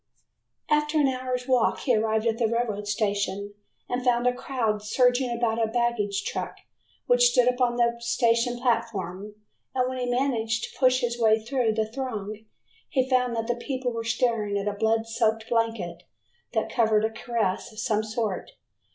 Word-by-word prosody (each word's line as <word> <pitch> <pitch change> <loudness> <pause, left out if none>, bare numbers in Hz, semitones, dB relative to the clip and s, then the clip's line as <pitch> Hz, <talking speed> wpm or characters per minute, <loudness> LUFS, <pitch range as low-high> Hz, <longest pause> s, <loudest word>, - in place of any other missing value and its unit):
After 300 +1 +2
an 285 - +4
hour's 255 -1 -2
walk 255 -3 +2
he 250 -4 +2
arrived 220 0 +1
at 230 0 0
the 230 - +3
railroad 220 -3 -2
station 205 -1 -1 0.3
and 245 0 -2
found 245 -1 +2
a 250 - +3
crowd 230 -5 -2
surging 245 +4 +2
about 235 -1 0
a - - +2
baggage 225 -4 0
truck - - -4 0.5
which - - +5
stood 250 - +3
upon 250 -1 +2
the 235 -1 +2
station 235 0 +1
platform, 210 -5 -2 0.4
and 255 -1 +2
when 255 0 -4
he 250 - -2
managed 240 -3 0
to - - -7
push 255 0 +4
his 240 0 -2
way 220 -1 +5
through 235 0 0
the 220 0 +1
throng 220 -3 -5 0.4
he 260 -2 +1
found 250 -2 +2
that 225 0 -1
the 240 - 0
people 255 +1 -3
were 230 -1 -4
staring 225 -3 0
at 200 +1 -3
a 205 - 0
blood 220 +2 +1
soaked 225 -1 0
blanket 225 -8 -1 0.5
that - - -1
covered 220 -2 +3
a 220 - -1
carcass 225 -4 -2
of 215 - -17
some 215 0 0
sort. 215 -3 -3
230 Hz, 175 wpm, -26 LUFS, 220-250 Hz, 0.5 s, which